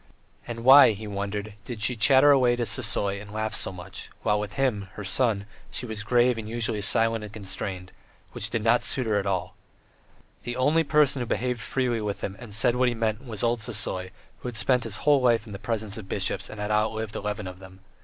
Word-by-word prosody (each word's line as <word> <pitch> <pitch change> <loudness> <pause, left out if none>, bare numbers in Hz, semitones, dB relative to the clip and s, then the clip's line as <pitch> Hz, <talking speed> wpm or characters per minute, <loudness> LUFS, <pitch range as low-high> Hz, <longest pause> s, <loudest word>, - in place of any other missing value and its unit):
And 115 -1 -6
why, 135 -2 +8
he 105 +2 -8
wondered, 100 +1 -4
did 115 -3 -7
she 125 - +1
chatter 135 +5 +5
away 125 -3 +4
to 120 -1 -2
Sisoy 100 -4 +1
and 105 -1 -11
laugh 110 0 -3
so - - 0
much; 95 +1 -9
while 105 0 +2
with 105 0 -5
him, 115 -8 -1
her 105 - -7
son, 105 0 +1 0.2
she - - -4
was 110 -2 -4
grave 120 +2 +2
and 110 -1 -7
usually 115 -2 -1
silent 115 +2 +2
and 105 - -8
constrained, 95 -3 -6 0.4
which - - -3
did 115 - -2
not 115 +2 +4
suit 130 - +4
her 110 -2 +1
at 100 - -4
all. 95 -2 -2 0.9
The 120 - -5
only 145 +6 +2
person 145 -2 +3
who 120 - -3
behaved 125 +1 -1
freely 125 -3 -1
with 105 -1 -4
him 95 - -4
and 120 -3 -10
said 115 +3 +2
what 125 0 +2
he 120 - -3
meant 110 +1 -1
was 110 -2 -2
old 120 0 +1
Sisoy, 105 -4 -2 0.3
who - - -7
had 120 -3 -5
spent 125 +3 +1
his 110 -3 -3
whole 145 -2 +5
life 120 -3 +2
in 105 - -10
the 100 - -7
presence 110 -1 -3
of 95 -3 -11
bishops 100 0 -2
and 110 - -9
had 105 +1 -3
outlived 110 0 -1
eleven 105 0 -4
of 90 0 -8
them. 95 0 -14
110 Hz, 225 wpm, -26 LUFS, 105-120 Hz, 0.9 s, why